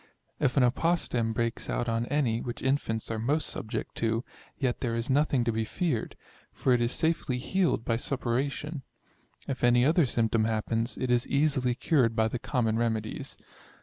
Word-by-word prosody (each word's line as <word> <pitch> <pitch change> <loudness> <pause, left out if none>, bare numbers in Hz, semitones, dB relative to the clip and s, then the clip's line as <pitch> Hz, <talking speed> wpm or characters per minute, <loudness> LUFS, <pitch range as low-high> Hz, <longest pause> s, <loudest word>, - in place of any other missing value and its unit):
If 130 - +1
an 135 - +6
apostem 125 -4 +1
breaks 115 +1 -2
out 120 - -1
on 115 +1 0
any 125 -5 +1
(which 120 - -6
infants 125 -5 0
are 110 - -2
most 145 +7 0
subject 110 - -4
to) 115 +1 0 0.3
yet 130 -3 -1
there 115 -3 -1
is 115 +3 -2
nothing 140 -2 +3
to 120 - +1
be 110 0 -1
feared, 145 - -2 0.4
for 130 - +1
it 120 - +2
is 120 +1 +1
safely 160 -5 0
healed 175 - 0
by 115 - +1
suppuration. 135 +4 -2 0.7
If 130 -2 -4
any 120 0 +5
other 160 0 +4
symptom 115 -2 +1
happens, 115 +1 -1
it 130 - -1
is 120 0 +2
easily 140 -4 +2
cured 125 -6 +2
by 110 -1 +2
the 120 - -3
common 115 -4 0
remedies. 110 -2 -2
120 Hz, 175 wpm, -28 LUFS, 115-140 Hz, 0.7 s, an